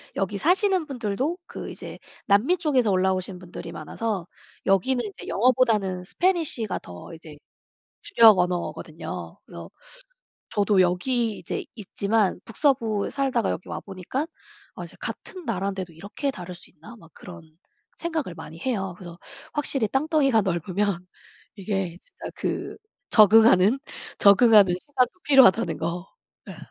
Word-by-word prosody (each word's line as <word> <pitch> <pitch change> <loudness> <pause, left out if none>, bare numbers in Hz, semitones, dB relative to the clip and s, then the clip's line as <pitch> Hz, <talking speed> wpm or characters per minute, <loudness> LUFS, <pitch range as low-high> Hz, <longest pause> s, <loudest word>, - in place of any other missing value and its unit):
여기 195 +1 -2
사시는 370 - +2
분들도 255 - -2
그 - - -8
이제 - - -9 0.3
남미 225 - +3
쪽에서 265 - +1
올라오신 185 0 0
분들이 180 -1 -9
많아서 210 -6 -4 0.4
여기는 240 +6 +2
이제 200 - -9
영어보다는 220 -5 +2
Spanish가 315 - -1
더 90 - -11
이제 160 -2 -11 0.7
주력 225 - +6
언어거든요. 180 -1 -4
그래서 - - -10 0.8
저도 205 -1 +2
여기 215 +5 +1
이제 - - -5
있지만 205 -1 0
북서부에 225 -5 0
살다가 265 -6 0
여기 - - -5
와 - - -5
보니깐 195 - -4 0.5
어 - - -6
이제 - - -12
'같은 370 -2 -7
나라인데도 190 -4 -3
이렇게 200 - -4
다를 180 -7 -8
수 175 - -13
있나?' 230 - -14
막 165 -7 -17
그런 165 -3 -13 0.4
생각을 320 - -3
많이 160 0 -10
해요. 195 -7 -2
그래서 175 -2 -11 0.3
확실히 275 -6 0
땅덩이가 275 -4 +2
넓으면 185 +1 -1 0.5
이게 195 -3 -3
진짜 - - -10
그 - - -4 0.3
적응하는, 215 +1 +6 0.4
적응하는 200 -2 +6
시간이 250 +6 0 0.2
필요하다는 255 -6 +5
거. 170 +3 -3 0.4
예. - - -8
205 Hz, 320 characters per minute, -25 LUFS, 185-255 Hz, 0.8 s, 주력